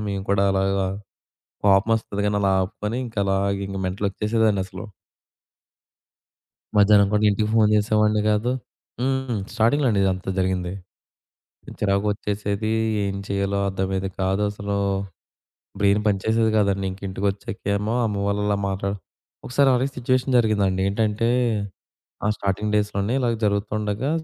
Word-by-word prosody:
మేము 100 -1 -3
కూడా 100 0 +3
అలాగా 95 0 +1 0.8
కోపమొస్తది 100 +1 +2
కానీ, 105 0 +1
అలా 100 -1 +3
ఆపుకొని 105 +4 -3
ఇంకా 115 -3 -5
అలా 95 0 +1 0.3
ఇంకా 95 0 -5
మెంటల్ 95 +3 -2
వచ్చేసేదండసలు. 105 -2 -1 1.9
మధ్యాహ్నం 100 -1 +6
కూడా 105 0 +2
ఇంటికి 105 +1 0
ఫోన్ 110 -2 +5
చేసేవాడిని 105 0 +2
కాదు. 105 +3 +1 0.5
హ్మ్. 130 -3 -1
స్టార్టింగ్‌లో 120 +5 +2
అండి 100 -3 +1
ఇదంతా 95 0 -1
జరిగింది. 90 -1 0 1.1
చిరాకొచ్చేసేది. 105 +1 -1 0.3
ఏం 100 0 -2
చేయాలో 100 0 -1
అర్థమయ్యేది 95 0 -2
కాదసలు. 100 +1 -1 1.0
బ్రెయిన్ 100 +1 +3
పని 100 -2 +2
చేసేది 110 0 +2
కాదండి. 100 -2 +1
ఇంకా 95 +1 -11
ఇంటికొచ్చాకేమో 100 +2 -2
అమ్మ 100 -2 -2
వాళ్ళు 100 0 0
అలా 100 -1 +1
మాట్లాడు 100 +1 -2 0.5
ఒకసారి 135 +2 +3
అలాగే 130 +2 +1
సిట్యుయేషన్ 130 +1 +1
జరిగిందండి. 100 -5 +2
ఏంటంటే 110 +2 0 1.0
ఆ - - +2
స్టార్టింగ్ 100 +2 -2
డేస్‌లోనే 105 +2 0
ఇలా 120 -2 +1
జరుగుతుండగా 105 +4 -1
100 Hz, 120 wpm, -23 LUFS, 100-110 Hz, 1.9 s, మధ్యాహ్నం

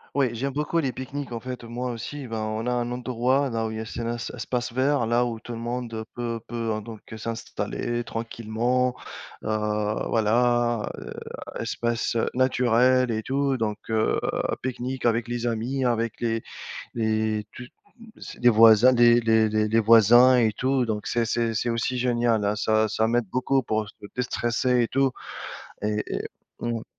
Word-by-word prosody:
Oui 140 -2 +3
j'aime 135 +4 -2
beaucoup 150 +4 0
les 135 -5 0
pique-niques 130 +1 -6
en 115 - -3
fait 125 0 -7
moi 120 +2 -4
aussi, 135 +4 -6
ben 115 -1 -4
on 110 +1 -3
a 125 - 0
un 120 0 -1
endroit 125 +2 0
dans 115 -2 -1
où - - -5
il 110 - -5
y - - -4
a 110 - -4
c'est 115 +1 -5
là 120 +1 -2
c'est 115 - -6
espace 120 0 -3
vert 130 0 +2
là 120 +1 +2
où 115 -2 -4
tout 120 - -8
le - - -5
monde 120 -1 -4
peut 115 -1 -3
peut, 115 -2 -2
heu, 110 - -4
donc 110 0 -9 0.2
s'installer 115 +1 -3
tranquillement, 115 +2 -1 0.5
heu, - - -3 0.6
voilà, 120 +1 +2
heu, - - -8 0.5
espace, 120 0 -1
heu, 115 - +1
naturel 125 0 +3
et 110 -1 -1
tout 135 +2 0
donc 110 -4 -1
heu, 110 - +1 0.4
pique-nique 130 0 -4
avec 115 0 +1
les 120 0 -2
amis 120 +4 -1
avec 115 -2 0
les 115 -1 -1 0.5
les 110 -1 0
tout 125 - -9 0.4
m 230 - -13
s - - -9
les 125 - +4
voisins 115 +2 +7
les 120 -1 +6
les 110 -1 +3
les 110 0 +1
les 110 +1 +3
voisins 115 +3 +7
et 110 -3 +3
tout 130 +3 +1
donc 105 -2 -3
c'est 120 -1 0
c'est 115 0 0
c'est 115 +3 -1
aussi 115 +2 -1
génial, 120 -3 +1
hein, 105 +1 +1
ça 110 0 +2
ça 110 +1 0
m'aide 120 -2 +1
beaucoup 130 +4 +1
pour 110 -3 -2
se - - -16 0.2
déstresser 125 0 +1
et - - 0
tout 135 +1 +2 0.7
et 105 0 0
et - - -3 0.4
Mmh. 115 -1 -3
120 Hz, 185 wpm, -25 LUFS, 110-125 Hz, 0.7 s, voisins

